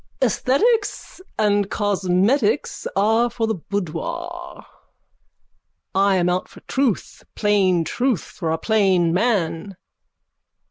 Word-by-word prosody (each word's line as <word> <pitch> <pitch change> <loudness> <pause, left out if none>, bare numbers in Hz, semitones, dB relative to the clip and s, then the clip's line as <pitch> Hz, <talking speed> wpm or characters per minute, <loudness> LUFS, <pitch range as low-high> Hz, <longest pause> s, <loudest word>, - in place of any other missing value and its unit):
_ - - +5
Esthetics 415 - 0 0.2
and 205 -2 +2
cosmetics 205 - +1
are 225 +4 +3
for 235 -1 -2
the 220 - 0
boudoir. 335 - -5 1.3
I 195 0 +3
am 175 -1 +2
out 180 +1 0
for - - -15
truth. 265 -7 -2
Plain 195 -5 +2
truth 245 - -1
for 165 - -5
a 160 - 0
plain 190 -5 +2
man. 190 -3 0
205 Hz, 105 wpm, -21 LUFS, 185-245 Hz, 1.3 s, _